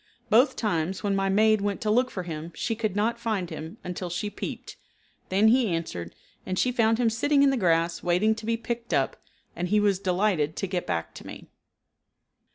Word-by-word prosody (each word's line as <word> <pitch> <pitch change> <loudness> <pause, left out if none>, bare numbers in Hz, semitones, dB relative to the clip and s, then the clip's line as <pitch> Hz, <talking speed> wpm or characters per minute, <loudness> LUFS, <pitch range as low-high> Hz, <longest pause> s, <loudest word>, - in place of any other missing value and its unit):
Both 245 +6 +5
times 185 -4 -1
when 200 -1 +1
my 195 0 +1
maid 215 +1 +4
went 200 -1 -1
to 210 - 0
look 250 +3 +3
for 185 - -5
him 165 -1 -6
she 225 - -2
could 215 -3 -2
not 230 +3 0
find 215 -7 -2
him 160 +2 -7
until 180 0 -5
she 180 +4 -3
peeped, - - -6 0.5
then 200 +4 +4
he 245 0 +4
answered, 160 - -4 0.3
and 185 - -3
she 250 - +2
found 225 -2 +2
him 235 -2 +2
sitting 280 +5 +3
in 275 - +5
the - - +1
grass 170 -5 +1
waiting 180 +5 +2
to 220 0 -8
be 230 0 +1
picked 235 0 -3
up, - - +1 0.4
and 180 - -2
he 210 +3 +3
was 200 -2 +2
delighted 180 -5 +1
to - - -2
get 180 -2 -3
back 80 0 -2
to - - -11
me. - - -10
200 Hz, 205 wpm, -26 LUFS, 175-225 Hz, 0.5 s, Both